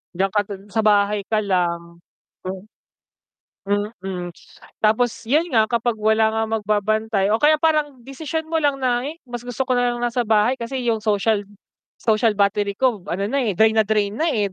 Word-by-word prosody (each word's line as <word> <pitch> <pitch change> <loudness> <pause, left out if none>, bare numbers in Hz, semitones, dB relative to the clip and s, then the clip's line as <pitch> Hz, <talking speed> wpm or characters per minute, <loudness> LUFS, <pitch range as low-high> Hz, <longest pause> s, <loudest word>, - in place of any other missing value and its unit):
diyan 190 +2 0
ka 210 - +2
dun 195 -1 -8
sa 225 - -1
bahay 205 -1 +3
ka 215 -1 +1
lang. 170 -3 -1 0.4
Hmm. 185 +1 -6 1.4
Mm, 180 -2 -5 0.5
tapos 220 +3 +3 0.2
'yan 310 +6 +3
nga 220 -2 +3
kapag 235 0 0
wala 220 +1 +3
nga 225 - 0
magbabantay 215 -1 0
o 220 - +3
kaya 300 +2 +4
parang 300 -5 +1
desisyon 310 +5 -5
mo 325 - -4
lang 290 -3 +1
na, 245 -1 0
eh, 320 +3 -6
mas 240 -1 -6
gusto 245 +2 -3
ko 255 - +2
nalang 245 -1 0
nasa 240 0 0
bahay 220 +3 +3
kasi 250 +2 -4
yung 220 -2 0
social, 210 0 +1 0.6
social 220 0 +2
battery 200 0 +1
ko 220 -5 0
ano 195 +2 -2
na, 280 - -1
eh, 210 - 0
drain 220 +4 +3
na 215 - +4
drain 210 -1 0
na, 315 - 0
eh, 210 -3 0
220 Hz, 180 wpm, -21 LUFS, 205-245 Hz, 1.4 s, kaya